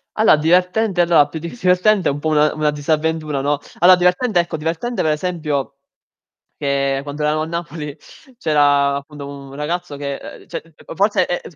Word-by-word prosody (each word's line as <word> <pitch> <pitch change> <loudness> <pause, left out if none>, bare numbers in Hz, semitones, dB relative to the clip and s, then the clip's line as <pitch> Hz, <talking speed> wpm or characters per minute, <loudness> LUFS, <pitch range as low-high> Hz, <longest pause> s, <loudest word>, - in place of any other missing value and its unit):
Allo 220 -5 +5
divertente 180 +5 +2
allora 165 -4 +4
più 160 +2 -7
di 170 +2 -6
s 245 - -17
divertente 185 +2 +3
un 140 - -2
po' 155 - -1
una 150 0 +3
una 150 -1 0
disavventura, 155 0 -1
no? 145 +1 0 0.2
Allora 180 +1 +7
divertente 180 +3 +2
ecco, 170 -2 -1
divertente 165 +9 -2
per 155 - +2
esempio 150 -4 -2 0.8
che 140 -1 0
quando 145 +1 -6
eravamo 155 +1 +1
a - - -3
Napoli 165 -3 -5 0.4
c'era, 145 - +3
appunto, 140 0 -7
un 140 -1 -10
ragazzo 150 +1 -4
che 140 -1 -4 0.2
uhm, - - -19
cioè 165 - -8 0.2
forse 195 -1 +2
è 175 - -2
155 Hz, 170 wpm, -19 LUFS, 145-175 Hz, 0.8 s, Allora